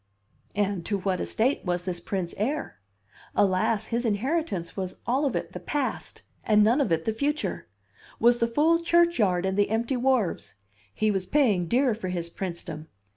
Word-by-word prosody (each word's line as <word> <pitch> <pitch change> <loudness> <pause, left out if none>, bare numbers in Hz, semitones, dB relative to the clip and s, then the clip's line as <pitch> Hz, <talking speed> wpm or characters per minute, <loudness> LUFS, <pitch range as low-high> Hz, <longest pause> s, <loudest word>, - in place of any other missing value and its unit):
And 200 -3 0
to 205 - 0
what 190 -1 -1
estate 250 +6 0
was 175 -1 -1
this 180 -1 -3
prince 185 -3 -3
heir? 250 - -3 0.6
Alas, 200 +2 +2
his 235 +1 +1
inheritance 225 - -1
was 185 -2 -4
all 270 +4 +1
of 265 - -2
it - - -3
the - - -6
Past 290 -3 -3 0.2
and 210 -1 +4
none 235 +7 +4
of 270 - 0
it 165 -1 +1
the 220 - 0
Future; 290 +6 -2 0.5
was 240 +1 +4
the 230 - +2
full 310 +8 +3
churchyard 335 - +3
and 190 +1 0
the 205 - +3
empty 230 +4 0
wharves! 240 - 0 0.4
He 215 - +1
was 190 -2 -2
paying 215 - +2
dear 250 +4 +3
for 210 -3 -5
his 170 -2 -3
princedom! 170 -4 -6
210 Hz, 175 wpm, -26 LUFS, 185-260 Hz, 0.6 s, and